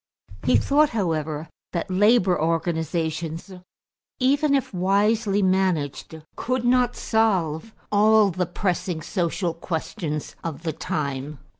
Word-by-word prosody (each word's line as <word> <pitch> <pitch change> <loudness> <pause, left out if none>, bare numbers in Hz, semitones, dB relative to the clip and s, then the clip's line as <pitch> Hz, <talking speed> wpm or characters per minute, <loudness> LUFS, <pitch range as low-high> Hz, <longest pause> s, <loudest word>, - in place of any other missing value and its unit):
He - - +3
thought, 295 +2 +3
however, 160 -4 -1 0.3
that 170 +1 -3
labor 195 -2 +4
organizations, 165 +1 -2 0.7
even 280 +3 +3
if 270 -6 -1
wisely 200 +3 +2
managed, 180 -5 0 0.2
could 255 0 -2
not 245 0 +3
solve 200 -5 0 0.2
all 210 0 +5
the 180 0 -1
pressing 175 -2 -2
social 175 -1 -1
questions 165 -2 -4
of 165 -1 -5
the 160 -2 -2
time. 140 -1 -3
180 Hz, 110 wpm, -24 LUFS, 160-215 Hz, 0.7 s, all